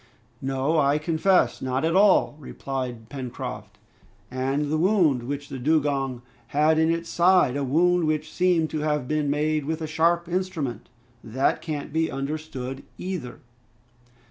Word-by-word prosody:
"No! 135 Hz, +4 st, 0 dB
I 140 Hz, 0 st, +3 dB
confess, 165 Hz, +4 st, +2 dB
not 130 Hz, +3 st, -1 dB
at 165 Hz, +2 st, +1 dB
all," 195 Hz, -6 st, +4 dB
replied 130 Hz, -5 st, -5 dB
Pencroft, 130 Hz, -2 st, -7 dB, 0.5 s
"and 135 Hz, +3 st, -1 dB
the 155 Hz, -, +2 dB
wound 170 Hz, -, +3 dB
which 145 Hz, 0 st, -4 dB
the 135 Hz, -2 st, -7 dB
dugong 135 Hz, -3 st, 0 dB, 0.2 s
had 155 Hz, +4 st, +3 dB
in 160 Hz, 0 st, +3 dB
its 165 Hz, 0 st, -1 dB
side, 175 Hz, -7 st, +3 dB
a 140 Hz, -, -1 dB
wound 170 Hz, +5 st, +2 dB
which 155 Hz, 0 st, -2 dB
seemed 175 Hz, -3 st, +2 dB
to 155 Hz, -, -2 dB
have 150 Hz, -3 st, -1 dB
been 150 Hz, 0 st, 0 dB
made 150 Hz, +1 st, 0 dB
with 160 Hz, +2 st, -2 dB
a 160 Hz, -, -3 dB
sharp 165 Hz, +2 st, +1 dB
instrument; 170 Hz, -, -3 dB, 0.3 s
that 125 Hz, +4 st, 0 dB
can't 150 Hz, -2 st, -5 dB
be 160 Hz, 0 st, +1 dB
understood, 135 Hz, -2 st, -5 dB, 0.2 s
either." 180 Hz, -9 st, -5 dB
150 Hz, 145 wpm, -25 LUFS, 135-165 Hz, 0.5 s, all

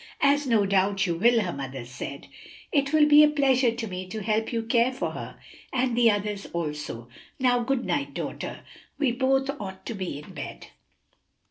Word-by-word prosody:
"As 285 Hz, 0 st, +3 dB
no 225 Hz, -4 st, +3 dB
doubt 195 Hz, 0 st, +2 dB
you 175 Hz, -, 0 dB
will," 230 Hz, +7 st, +4 dB
her 180 Hz, -4 st, -2 dB
mother 135 Hz, -2 st, -6 dB
said. 130 Hz, +3 st, -7 dB, 0.5 s
"It 280 Hz, -2 st, +1 dB
will 310 Hz, -1 st, +5 dB
be 300 Hz, 0 st, +8 dB
a 300 Hz, -, +6 dB
pleasure 270 Hz, -4 st, +3 dB
to 230 Hz, 0 st, -3 dB
me 185 Hz, -2 st, -6 dB
to 215 Hz, +3 st, -5 dB
help 220 Hz, +2 st, 0 dB
you 230 Hz, -2 st, -1 dB
care 235 Hz, +2 st, +2 dB
for 260 Hz, -, -3 dB
her, -, -, -8 dB, 0.3 s
and 250 Hz, -2 st, 0 dB
the 240 Hz, -1 st, +5 dB
others 205 Hz, -1 st, -2 dB
also. 150 Hz, -8 st, -4 dB, 0.3 s
Now, 250 Hz, -1 st, +3 dB
good 250 Hz, +1 st, -1 dB
night, 285 Hz, -1 st, -2 dB
daughter; -, -, -5 dB, 0.4 s
we 280 Hz, -4 st, +2 dB
both 270 Hz, +2 st, +1 dB
ought 190 Hz, -2 st, -7 dB
to -, -, -4 dB
be 185 Hz, -8 st, -4 dB
in 150 Hz, -, -11 dB
bed." -, -, -7 dB
230 Hz, 190 wpm, -26 LUFS, 190-265 Hz, 0.5 s, be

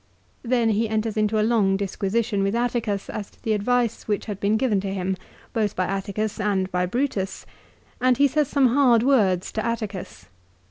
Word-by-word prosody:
1 235 Hz, -, -9 dB
Then 240 Hz, -3 st, +3 dB
he 220 Hz, +1 st, +1 dB
enters 220 Hz, 0 st, -1 dB
into 215 Hz, 0 st, +1 dB
a 215 Hz, -, +3 dB
long 210 Hz, -4 st, +2 dB
disquisition 200 Hz, +2 st, -1 dB
with 195 Hz, +2 st, 0 dB
Atticus 235 Hz, -4 st, -1 dB
as 205 Hz, -2 st, -5 dB
to -, -, -28 dB
the 220 Hz, -, +1 dB
advice 235 Hz, +2 st, 0 dB
which 210 Hz, -2 st, -1 dB
had 205 Hz, -3 st, -5 dB
been 205 Hz, +2 st, +2 dB
given 220 Hz, -5 st, +1 dB
to 195 Hz, 0 st, -3 dB
him, 190 Hz, 0 st, -1 dB, 0.4 s
both 215 Hz, -3 st, 0 dB
by 185 Hz, -, 0 dB
Atticus 200 Hz, +3 st, -3 dB
and 190 Hz, -2 st, 0 dB
by 180 Hz, 0 st, 0 dB
Brutus, 215 Hz, -3 st, -2 dB, 0.6 s
and 255 Hz, -1 st, +3 dB
he 285 Hz, -, +5 dB
says 295 Hz, +1 st, +1 dB
some 270 Hz, -2 st, +3 dB
hard 245 Hz, -3 st, +4 dB
words 205 Hz, -10 st, +2 dB
to 215 Hz, -, -2 dB
Atticus. 215 Hz, -5 st, -4 dB
215 Hz, 190 wpm, -24 LUFS, 195-235 Hz, 0.6 s, he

